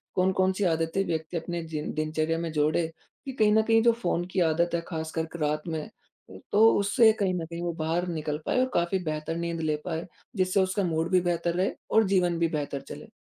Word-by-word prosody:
कौन-कौन 185 Hz, 0 st, +2 dB
सी 200 Hz, -, -2 dB
आदतें 165 Hz, +1 st, +1 dB
व्यक्ति 160 Hz, 0 st, -3 dB
अपने 170 Hz, 0 st, -4 dB
जिन 150 Hz, 0 st, -3 dB
दिनचर्या 155 Hz, +1 st, -1 dB
में 165 Hz, -1 st, -3 dB
जोड़े 155 Hz, +2 st, +1 dB, 0.4 s
कि, 270 Hz, -, -4 dB
कहीं 215 Hz, -5 st, +3 dB
न 220 Hz, -, +5 dB
कहीं 225 Hz, +1 st, +3 dB
जो 235 Hz, -, +6 dB
फ़ोन 175 Hz, 0 st, 0 dB
की 190 Hz, -, 0 dB
आदत 170 Hz, +2 st, +1 dB
है 170 Hz, -, -1 dB
खासकर 160 Hz, -1 st, -3 dB
क -, -, -5 dB
रात 150 Hz, 0 st, 0 dB
में, 160 Hz, -2 st, -4 dB, 0.4 s
उ 95 Hz, -, -11 dB
तो 220 Hz, +2 st, +6 dB
उससे 210 Hz, +3 st, +5 dB
कहीं 190 Hz, -2 st, +1 dB
न 175 Hz, -2 st, -2 dB
कहीं 170 Hz, +1 st, -7 dB
वो 175 Hz, 0 st, -1 dB
बाहर 165 Hz, +3 st, 0 dB
निकल 155 Hz, -3 st, -3 dB
पाए -, -, +1 dB
और 255 Hz, 0 st, +2 dB
काफ़ी 175 Hz, +2 st, +1 dB
बेहतर 155 Hz, 0 st, -3 dB
नींद 170 Hz, -1 st, -3 dB
ले 155 Hz, -1 st, +1 dB
पाए, 165 Hz, -1 st, -3 dB, 0.3 s
जिससे 185 Hz, 0 st, +2 dB
उसका 190 Hz, +2 st, 0 dB
मूड 165 Hz, -1 st, 0 dB
भी 185 Hz, -1 st, +4 dB
बेहतर 175 Hz, -1 st, 0 dB
रहे 185 Hz, +2 st, +1 dB, 0.2 s
और 220 Hz, -, +5 dB
जीवन 180 Hz, -3 st, +2 dB
भी 170 Hz, -, +3 dB
बेहतर 145 Hz, -3 st, -3 dB
चले? -, -, -10 dB
170 Hz, 220 wpm, -27 LUFS, 160-185 Hz, 0.4 s, जो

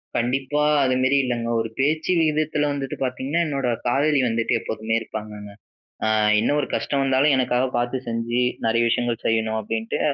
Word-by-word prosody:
கண்டிப்பா. 135 Hz, +4 st, 0 dB, 0.2 s
அது 130 Hz, -1 st, +2 dB
மாதிரி 130 Hz, +2 st, +3 dB
இல்லங்க, 120 Hz, -2 st, -2 dB
ஒரு 115 Hz, -, -4 dB
பேச்சு 155 Hz, +6 st, +1 dB
விகிதத்துல 155 Hz, -1 st, +1 dB
வந்துட்டு 135 Hz, -2 st, -4 dB
பாத்தீங்கன்னா, 130 Hz, +6 st, -1 dB
என்னோட 135 Hz, -3 st, -2 dB, 0.2 s
காதலி 145 Hz, +3 st, +2 dB
வந்துட்டு 115 Hz, 0 st, 0 dB
எப்போதுமே 110 Hz, 0 st, -4 dB
இருப்பாங்கங்க. 105 Hz, -2 st, -7 dB, 0.6 s
அ -, -, +2 dB, 0.3 s
என்ன 115 Hz, -, +1 dB
ஒரு -, -, -2 dB
கஷ்டம் 140 Hz, -1 st, -1 dB
வந்தாலும், 135 Hz, +2 st, +3 dB
எனக்காக 125 Hz, 0 st, +1 dB
பாத்து 120 Hz, +2 st, -1 dB
செஞ்சு 115 Hz, +1 st, -1 dB, 0.3 s
நிறைய 115 Hz, +1 st, +2 dB
விஷயங்கள் 120 Hz, 0 st, -1 dB
செய்யணும் 110 Hz, -1 st, 0 dB
அப்படின்ட்டு, 110 Hz, +1 st, -3 dB
125 Hz, 155 wpm, -23 LUFS, 115-140 Hz, 0.6 s, மாதிரி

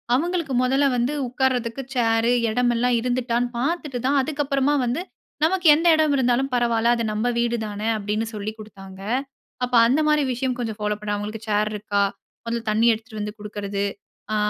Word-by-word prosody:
அவங்களுக்கு 335 Hz, -1 st, -1 dB
முதல்ல 270 Hz, +2 st, +3 dB
வந்து 245 Hz, +4 st, 0 dB
உக்காரதற்கு 255 Hz, -1 st, -1 dB
சேரு, 230 Hz, 0 st, +2 dB, 0.2 s
எடம் 245 Hz, +2 st, +2 dB
எல்லாம் 245 Hz, +1 st, +2 dB
இருந்துட்டான்னு 245 Hz, 0 st, 0 dB
பாத்துட்டு 295 Hz, -2 st, -2 dB
தான் 280 Hz, +1 st, +3 dB
அதுக்கு 290 Hz, +1 st, -2 dB
அப்புறமா 275 Hz, +1 st, +1 dB
வந்து 255 Hz, +8 st, -1 dB, 0.4 s
நமக்கு 360 Hz, +1 st, +2 dB
எந்த 335 Hz, +2 st, +1 dB
எடம் 310 Hz, -2 st, +2 dB
இருந்தாலும் 255 Hz, +1 st, +1 dB
பரவாயில்ல 235 Hz, -1 st, +2 dB
அது 230 Hz, -, -2 dB
நம்ம 220 Hz, +3 st, 0 dB
வீடுதான 220 Hz, -3 st, -2 dB, 0.2 s
அப்படின்னு 210 Hz, +2 st, -2 dB
சொல்லிக் 215 Hz, +1 st, -5 dB
குடுத்தாங்க. 195 Hz, -3 st, -11 dB, 0.6 s
அப்ப 245 Hz, 0 st, -2 dB
அந்த 270 Hz, +6 st, +2 dB
மாரி 300 Hz, -1 st, +3 dB
விஷயம் 255 Hz, 0 st, -2 dB
கொஞ்சம் 225 Hz, -3 st, -3 dB
ஃபாலோ 210 Hz, 0 st, -1 dB
பண்ண 205 Hz, 0 st, -2 dB
அவங்களுக்கு 210 Hz, +2 st, -6 dB
சேர் 210 Hz, +1 st, +1 dB
இருக்கா? 205 Hz, -1 st, 0 dB, 0.4 s
அதில 230 Hz, 0 st, -2 dB
தண்ணீ 225 Hz, +2 st, +3 dB
எடுத்துட்டு 220 Hz, -1 st, -7 dB
வந்து 210 Hz, +1 st, -5 dB
குடுக்கிறது 205 Hz, -1 st, -3 dB, 0.5 s
அ -, -, +1 dB
235 Hz, 165 wpm, -23 LUFS, 215-265 Hz, 0.6 s, முதல்ல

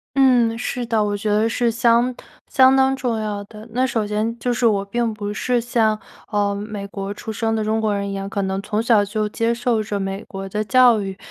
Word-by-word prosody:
嗯， 250 Hz, -4 st, +4 dB
是 245 Hz, 0 st, -3 dB
的， 225 Hz, -2 st, +1 dB
我 205 Hz, 0 st, -1 dB
觉 205 Hz, -, -4 dB
得 210 Hz, +2 st, +2 dB
是 235 Hz, 0 st, +1 dB
相 235 Hz, +2 st, +3 dB, 0.3 s
相 260 Hz, 0 st, +5 dB
当 265 Hz, 0 st, +3 dB
重 245 Hz, -4 st, -2 dB
要 210 Hz, -1 st, -3 dB
的。 215 Hz, +2 st, -12 dB
那 250 Hz, +3 st, +1 dB
首 225 Hz, -3 st, -1 dB
先 215 Hz, +3 st, -2 dB
就 245 Hz, +1 st, -1 dB
是 235 Hz, 0 st, +2 dB
我 200 Hz, -3 st, +1 dB
并 235 Hz, +3 st, -1 dB
不 205 Hz, -1 st, -5 dB
是 245 Hz, +3 st, 0 dB
像， 225 Hz, -2 st, +1 dB, 0.3 s
呃， 205 Hz, -1 st, +1 dB
美 205 Hz, 0 st, -5 dB
国 200 Hz, 0 st, -5 dB
出 220 Hz, -, -6 dB
生 225 Hz, +1 st, -1 dB
的 220 Hz, -, -1 dB
中 220 Hz, +1 st, 0 dB
国 215 Hz, -2 st, +1 dB
人 200 Hz, 0 st, -2 dB
一 -, -, -4 dB
样， 195 Hz, 0 st, -4 dB
可 200 Hz, 0 st, -2 dB
能 190 Hz, 0 st, -2 dB
从 210 Hz, +1 st, -1 dB
小 230 Hz, -3 st, +4 dB
就 210 Hz, +1 st, -2 dB
接 230 Hz, +2 st, 0 dB
受 235 Hz, -2 st, 0 dB
着 205 Hz, -1 st, -3 dB
美 195 Hz, +1 st, -4 dB
国 195 Hz, 0 st, -7 dB
的 210 Hz, +2 st, -2 dB
教 240 Hz, +1 st, +5 dB
育。 195 Hz, -1 st, -5 dB
215 Hz, 250 characters per minute, -21 LUFS, 205-235 Hz, 0.3 s, 相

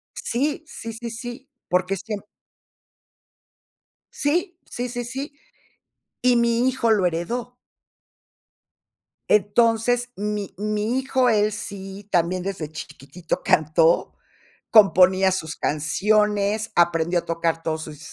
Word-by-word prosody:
Sí, 285 Hz, +6 st, -2 dB
sí, 230 Hz, -6 st, -7 dB
sí, 235 Hz, +1 st, -6 dB
sí, 240 Hz, +4 st, -7 dB, 0.2 s
porque 180 Hz, +1 st, +1 dB
es 190 Hz, -, -8 dB
que. 220 Hz, -, -3 dB, 2.0 s
Sí, 345 Hz, +5 st, -1 dB
sí, 245 Hz, +1 st, -4 dB
sí, 245 Hz, 0 st, -4 dB
sí, 270 Hz, +5 st, -5 dB, 0.9 s
y 250 Hz, -1 st, +4 dB
mi 235 Hz, +1 st, +2 dB
hijo 255 Hz, -3 st, +1 dB
lo 205 Hz, -4 st, +3 dB
heredó. 230 Hz, +9 st, -2 dB, 1.8 s
Entonces, 230 Hz, +4 st, +3 dB
mi 205 Hz, -1 st, -4 dB
mi 215 Hz, +3 st, -1 dB
hijo, 260 Hz, -1 st, +2 dB
él 210 Hz, -1 st, +3 dB
sí, 200 Hz, -1 st, -7 dB
también 175 Hz, +1 st, +1 dB
desde 185 Hz, -4 st, -4 dB
chiquititito 150 Hz, +2 st, -6 dB
cantó, 160 Hz, +2 st, +3 dB, 0.6 s
componía 190 Hz, -3 st, +6 dB
sus 160 Hz, -4 st, -3 dB
canciones, 210 Hz, +7 st, +1 dB
aprendió 170 Hz, 0 st, +2 dB
a -, -, -19 dB
tocar 165 Hz, 0 st, -1 dB
todos 160 Hz, -1 st, -2 dB
sus 150 Hz, -2 st, -10 dB
210 Hz, 115 wpm, -23 LUFS, 175-240 Hz, 2.0 s, componía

